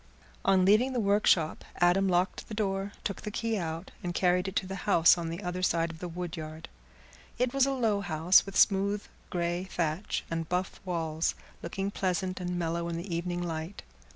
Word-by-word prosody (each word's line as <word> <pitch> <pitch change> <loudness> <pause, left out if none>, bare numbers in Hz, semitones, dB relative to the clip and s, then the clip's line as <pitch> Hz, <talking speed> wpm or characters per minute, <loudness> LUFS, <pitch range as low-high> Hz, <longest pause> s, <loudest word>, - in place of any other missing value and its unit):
On 190 -1 +4
leaving 225 +7 +4
the 250 - 0
workshop 200 -6 +2
Adam 180 +2 +3
locked 180 +1 0
the 215 - -6
door, 195 -1 -1
took 200 - -3
the - - -4
key 225 +1 -1
out, 165 -2 -4
and 175 -1 -3
carried 180 0 +2
it 190 - -5
to - - +1
the 190 - -6 0.2
house 170 -3 +7
on 170 -2 -4
the 170 +5 -5
other 180 0 -3
side 165 -2 +1
of 160 - -12
the 180 - -4
woodyard. 165 -2 -6 0.7
It 245 0 0
was 275 -1 +4
a - - +1
low 225 -6 +1
house, 170 0 +4
with 195 0 -5
smooth 200 +1 +3 0.3
grey 175 +1 -1
thatch 170 0 -2
and 165 -1 -2
buff 180 +1 -2
walls, 165 -3 -1 0.3
looking 195 +1 -3
pleasant 185 -1 -1
and 180 0 -3
mellow 170 0 -1
in 165 - -3
the 170 0 -4
evening 175 +1 -2
light. 165 +2 -5
180 Hz, 190 wpm, -29 LUFS, 170-195 Hz, 0.7 s, house